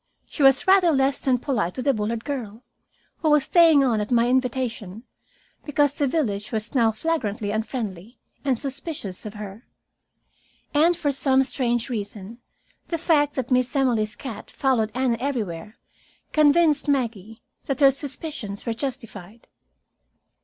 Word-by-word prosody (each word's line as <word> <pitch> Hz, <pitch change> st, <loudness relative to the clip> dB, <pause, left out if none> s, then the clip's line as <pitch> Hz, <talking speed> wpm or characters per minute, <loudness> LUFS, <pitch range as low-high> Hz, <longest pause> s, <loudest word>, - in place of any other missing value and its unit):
She -, -, -7 dB
was 270 Hz, -1 st, +5 dB
rather 375 Hz, -3 st, +5 dB
less 270 Hz, -1 st, +1 dB
than 260 Hz, -3 st, +2 dB
polite 230 Hz, -, -2 dB
to 255 Hz, -, -3 dB
the 275 Hz, -, +3 dB
Bullard 220 Hz, +1 st, -3 dB
girl, 245 Hz, -5 st, -5 dB, 0.5 s
who 315 Hz, -, 0 dB
was 300 Hz, -2 st, +4 dB
staying 330 Hz, -5 st, +5 dB
on 230 Hz, -5 st, +1 dB
at 210 Hz, -, -4 dB
my 240 Hz, 0 st, +3 dB
invitation 245 Hz, -5 st, -2 dB, 0.6 s
because 290 Hz, -1 st, +1 dB
the 290 Hz, -1 st, 0 dB
village 215 Hz, -9 st, -2 dB
was 220 Hz, +2 st, -3 dB
now 230 Hz, -4 st, +3 dB
flagrantly 220 Hz, -6 st, -2 dB
unfriendly 220 Hz, -1 st, -4 dB, 0.3 s
and 270 Hz, -4 st, +1 dB
suspicious 265 Hz, -, -5 dB
of 210 Hz, -, -9 dB
her. 210 Hz, +2 st, -9 dB, 1.1 s
And 325 Hz, +4 st, +3 dB
for 290 Hz, -, 0 dB
some 270 Hz, -1 st, +2 dB
strange 240 Hz, -3 st, -1 dB
reason, 210 Hz, -1 st, -6 dB, 0.5 s
the 335 Hz, -, -2 dB
fact 300 Hz, -3 st, +2 dB
that 260 Hz, -1 st, -3 dB
Miss 250 Hz, 0 st, +1 dB
Emily's 235 Hz, -6 st, +1 dB
cat 230 Hz, -6 st, -8 dB
followed 240 Hz, -5 st, 0 dB
Anne 255 Hz, -2 st, +1 dB
everywhere 220 Hz, -7 st, -4 dB, 0.6 s
convinced 305 Hz, 0 st, +4 dB
Maggie 225 Hz, -6 st, -2 dB, 0.2 s
that 275 Hz, -2 st, -2 dB
her 275 Hz, -2 st, +7 dB
suspicions 275 Hz, -6 st, -5 dB
were 230 Hz, -, -1 dB
justified. 230 Hz, -5 st, -7 dB
255 Hz, 145 wpm, -24 LUFS, 220-280 Hz, 1.1 s, her